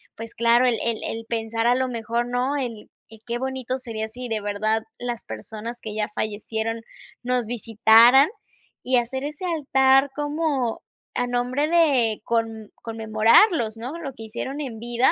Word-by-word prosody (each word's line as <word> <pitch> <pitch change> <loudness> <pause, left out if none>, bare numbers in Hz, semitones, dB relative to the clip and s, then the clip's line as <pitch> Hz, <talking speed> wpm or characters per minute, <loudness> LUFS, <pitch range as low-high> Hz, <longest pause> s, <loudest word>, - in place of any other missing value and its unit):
pues 225 +1 -8
claro, 235 +2 +4
el 245 -2 +2
el 230 -2 -1
el 225 0 -4
pensar 225 0 -1
a 245 - +4
lo 260 0 0
mejor, 235 0 -2
¿no? 250 +3 0
El 235 -6 -5 0.4
qué 240 +1 -2
bonito 260 -1 -3
sería 225 -4 -5
si 245 +2 -7
de 220 -1 0
verdad 215 +2 0
las 240 -1 -4
personas 220 - -7
que 215 - -6
ya 210 0 -1
fallecieron 220 +2 -3 0.4
nos 250 -1 0
visitaran, 230 +4 +6 0.5
y 255 - +1
hacer 260 +3 -2
ese 300 +5 -5
altar 270 -4 +3
como 290 -5 -1 0.3
a 245 - 0
nombre 250 +4 0
de 280 -10 +3
con 225 -2 -2
conmemorarlos, 225 - +3
¿no?, 250 +8 -5
lo 280 -5 -6
que 225 - -10
hicieron 260 +6 -5
en 245 -6 -6
vida. 240 +2 +2
235 Hz, 160 wpm, -24 LUFS, 225-265 Hz, 0.5 s, visitaran